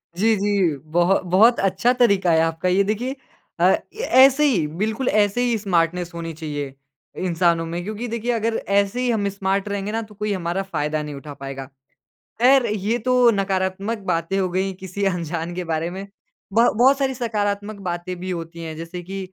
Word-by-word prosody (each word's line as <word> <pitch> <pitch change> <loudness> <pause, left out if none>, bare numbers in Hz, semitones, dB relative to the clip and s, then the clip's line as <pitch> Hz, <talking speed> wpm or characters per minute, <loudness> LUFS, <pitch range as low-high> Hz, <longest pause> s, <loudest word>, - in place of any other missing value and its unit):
जी, 220 +4 +3
जी, 200 -5 +1
बहु 175 +4 +2
बहुत 220 +7 +5
अच्छा 195 +5 +2
तरीक़ा 200 -8 +3
है 160 - +4
आपका। 165 +2 0
ये 190 +2 +3
देखिए 235 +7 -2 0.4
अ, - - +1
ऐ - - +6 0.5
ऐसे 275 +2 +3
ही, 195 - +2
बिल्कुल 215 - -2
ऐसे 210 +2 +2
ही 240 -2 +1
स्मार्टनेस 175 -3 0
होनी 165 -1 -5
चाहिए, 145 -3 -5 0.5
इंसानों 170 -1 +2
में, 170 +2 -4
क्योंकि 215 +5 -5
देखिए, 235 +1 -2
अगर 230 0 0 0.2
ऐसे 200 +5 +1
ही 250 - 0
हम 210 -3 0
स्मार्ट 195 +1 -1
रहेंगे 200 0 -3
ना, 225 +1 -1
तो 210 -2 -12
कोई 210 0 -2
हमारा 180 0 -2
फ़ायदा 150 -1 -1
नहीं 150 -1 -6
उठा 145 +1 -9
पाएगा। 135 -1 -7 0.8
ख़ैर, 260 0 +6
ये 210 +1 -1
तो 250 -1 +5
नकारात्मक 195 +3 -1
बातें 170 +3 -1
हो 190 - +1
गईं 190 +2 -1
किसी 190 +2 -4
अनजान 170 -2 -2
के 180 - -3
बारे 160 +1 -1
में। 195 +1 -7 0.5
बह 230 +3 +5
बहुत 270 +2 +6
सारी 270 -1 0
सकारात्मक 210 -3 -2
बातें 175 +1 -4
भी 185 +1 -5
होती 170 -1 -6
हैं, 160 -1 -6
जैसे 170 +2 -7
कि 195 +3 -6
195 Hz, 185 wpm, -22 LUFS, 170-220 Hz, 0.8 s, ऐ